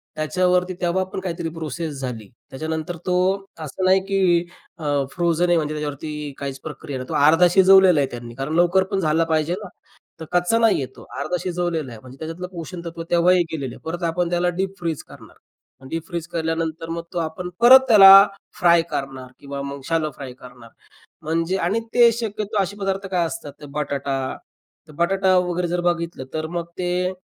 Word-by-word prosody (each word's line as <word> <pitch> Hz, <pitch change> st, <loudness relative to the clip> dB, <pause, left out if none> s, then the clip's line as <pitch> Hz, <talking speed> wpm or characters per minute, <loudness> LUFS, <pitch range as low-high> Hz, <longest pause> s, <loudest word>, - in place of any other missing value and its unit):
त्याच्यावरती 180 Hz, +3 st, +1 dB
तेव्हा 180 Hz, +1 st, +1 dB
पण -, -, -4 dB
काहीतरी 170 Hz, -3 st, -4 dB
प्रोसेस 160 Hz, 0 st, -5 dB
झाली, 115 Hz, -5 st, -6 dB, 0.2 s
त्याच्यानंतर 160 Hz, +4 st, -4 dB
तो 180 Hz, -, +1 dB, 0.4 s
असं 155 Hz, +4 st, -5 dB
नाही, 190 Hz, +1 st, +5 dB
की 185 Hz, -3 st, +2 dB, 0.3 s
अ, 145 Hz, -3 st, 0 dB
फ्रोझन 175 Hz, 0 st, +1 dB
आहे 175 Hz, -1 st, +3 dB
म्हणजे 155 Hz, -1 st, -1 dB
त्याच्यावरती 150 Hz, 0 st, -5 dB
काहीच 140 Hz, -1 st, -5 dB
प्रक्रिया 145 Hz, -2 st, -6 dB
नाही, 130 Hz, -, -8 dB
तो -, -, -4 dB
अर्धा 165 Hz, +4 st, +6 dB
शिजवलेला 190 Hz, -2 st, +6 dB
आहे 140 Hz, -, +2 dB
त्यांनी, 120 Hz, -1 st, -8 dB
कारण 135 Hz, +4 st, -4 dB
लवकर 175 Hz, +2 st, +4 dB
पण 195 Hz, -, 0 dB
झाला 160 Hz, -1 st, +2 dB
पाहिजे 160 Hz, +1 st, 0 dB
ना, -, -, -7 dB, 0.5 s
तर 160 Hz, -, -7 dB
कच्चा 180 Hz, +5 st, +2 dB
नाही 225 Hz, -9 st, +3 dB
आहे -, -, -2 dB
तो, -, -, -13 dB, 0.2 s
अर्धा 180 Hz, -, -1 dB
शिजवलेला 175 Hz, -6 st, -2 dB
आहे. 115 Hz, -, -10 dB
म्हणजे 130 Hz, +2 st, -13 dB
त्याच्यातलं 165 Hz, +3 st, -6 dB
पोषणतत्व 170 Hz, -1 st, -7 dB
तेव्हाही 175 Hz, +1 st, +4 dB
गेलेलं 135 Hz, -6 st, -4 dB
आहे, -, -, -14 dB
परत 170 Hz, +2 st, -4 dB
आपण 170 Hz, +1 st, 0 dB
त्याला 175 Hz, 0 st, +1 dB
डीप 195 Hz, +1 st, -2 dB
फ्रीज 165 Hz, -4 st, -3 dB
करणार, -, -, -15 dB, 0.4 s
मग 130 Hz, -, -12 dB
डीप 165 Hz, 0 st, -4 dB
फ्रीज 170 Hz, -2 st, -5 dB
केल्यानंतर 165 Hz, 0 st, -2 dB
मग 165 Hz, 0 st, -4 dB
तो -, -, -1 dB
आपण 165 Hz, +2 st, -4 dB
परत 250 Hz, +3 st, +9 dB
त्याला 205 Hz, -5 st, +9 dB, 0.5 s
फ्राय 170 Hz, -3 st, +5 dB
करणार 135 Hz, -2 st, -5 dB
किंवा 140 Hz, 0 st, -6 dB
मग 140 Hz, 0 st, -6 dB
शॅलो 160 Hz, -2 st, 0 dB
फ्राय 135 Hz, -3 st, -8 dB
करणार, 125 Hz, -2 st, -14 dB, 0.5 s
म्हणजे 165 Hz, +4 st, -1 dB
आणि 210 Hz, +6 st, +1 dB
ते 240 Hz, -1 st, +7 dB
शक्यतो 215 Hz, -3 st, -2 dB
असे 195 Hz, +2 st, -5 dB
पदार्थ 195 Hz, 0 st, -2 dB
काय 180 Hz, -2 st, +1 dB
असतात, 150 Hz, -2 st, -7 dB
ते 145 Hz, -, -9 dB
बटाटा 140 Hz, -1 st, -2 dB, 0.7 s
तर -, -, -13 dB
बटाटा 190 Hz, +2 st, +2 dB
वगैरे 180 Hz, -1 st, -1 dB
जर 175 Hz, +1 st, -1 dB
बघितलं, 170 Hz, -4 st, -2 dB
तर 155 Hz, 0 st, -2 dB
मग 170 Hz, -1 st, -2 dB
ते 180 Hz, 0 st, -1 dB
170 Hz, 185 wpm, -22 LUFS, 150-180 Hz, 0.7 s, परत